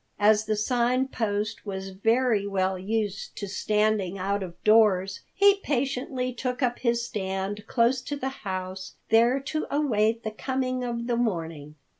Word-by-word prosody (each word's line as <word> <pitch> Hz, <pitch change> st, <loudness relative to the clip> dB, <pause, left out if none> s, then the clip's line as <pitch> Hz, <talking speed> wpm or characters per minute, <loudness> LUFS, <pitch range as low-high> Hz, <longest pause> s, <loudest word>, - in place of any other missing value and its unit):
As 210 Hz, +1 st, +4 dB
the 215 Hz, 0 st, 0 dB
Sign 245 Hz, +4 st, +1 dB
Post 215 Hz, -2 st, -2 dB
was 195 Hz, -2 st, -5 dB
very 225 Hz, +1 st, +2 dB
well 190 Hz, -1 st, 0 dB
used 205 Hz, 0 st, -2 dB
to 200 Hz, -, -4 dB
standing 210 Hz, -1 st, 0 dB
out 200 Hz, +2 st, -1 dB
of 175 Hz, -3 st, -6 dB
doors, 205 Hz, -4 st, +4 dB
he 400 Hz, 0 st, +5 dB
patiently 255 Hz, -4 st, -1 dB
took 250 Hz, +1 st, -3 dB
up 245 Hz, -1 st, 0 dB
his 235 Hz, -1 st, +1 dB
stand 195 Hz, 0 st, -3 dB
close 245 Hz, +1 st, +2 dB
to 290 Hz, -, -3 dB
the 265 Hz, -2 st, -2 dB
house, 185 Hz, -1 st, -5 dB
there 235 Hz, +4 st, +4 dB
to 310 Hz, +3 st, -3 dB
await 230 Hz, -6 st, +1 dB
the 220 Hz, -, -3 dB
coming 255 Hz, +2 st, -2 dB
of 235 Hz, -1 st, -3 dB
the 240 Hz, 0 st, 0 dB
morning. 165 Hz, -9 st, -2 dB
220 Hz, 155 wpm, -26 LUFS, 195-250 Hz, -, he